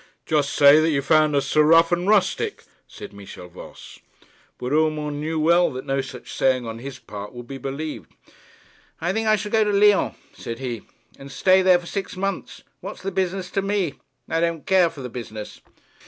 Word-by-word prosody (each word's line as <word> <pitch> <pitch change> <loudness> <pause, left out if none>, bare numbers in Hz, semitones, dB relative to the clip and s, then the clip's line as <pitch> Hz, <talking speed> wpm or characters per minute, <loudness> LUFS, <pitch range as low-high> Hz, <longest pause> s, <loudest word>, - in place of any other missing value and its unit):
'Just 150 -2 +1
say 145 +1 +7
that 160 +1 +2
you 145 -3 +1
found 155 +1 +3
us 140 - +1
so 155 - +3
rough 165 +2 +5
and 175 +2 0
rustic,' 205 -3 +1 0.2
said - - -11
Michel 100 -3 -11
Voss. 90 +1 -13 0.6
But 125 - -5
Urmand 150 -1 0
knew 160 +1 -2
well 170 +3 +3
that 130 - -6
no 135 0 0
such 130 -2 -10
saying 130 -2 +1
on 115 0 -6
his 135 +2 -8
part 105 -3 -9
would 120 -1 -9
be 135 +2 -8
believed. 140 +4 -6 0.9
'I 175 +3 -1
think 220 +1 -1
I 215 - +5
shall 210 0 -5
go 220 -1 +4
to 210 - 0
Lyons,' 205 0 +3 0.2
said 115 - -7
he, 120 -4 -5 0.4
'and 135 0 -10
stay 185 +8 +4
there 185 -1 +5
for 175 - -10
six 195 +1 -5
months. 195 +1 -4 0.2
What's - - -9
the 195 - -3
business 185 -1 -2
to 195 - 0
me? 195 -6 -1 0.3
I 165 - -1
don't 170 -2 -1
care 185 -3 +4
for 145 - -11
the 125 - -5
business.' 110 -3 -8
155 Hz, 200 wpm, -23 LUFS, 135-185 Hz, 0.9 s, say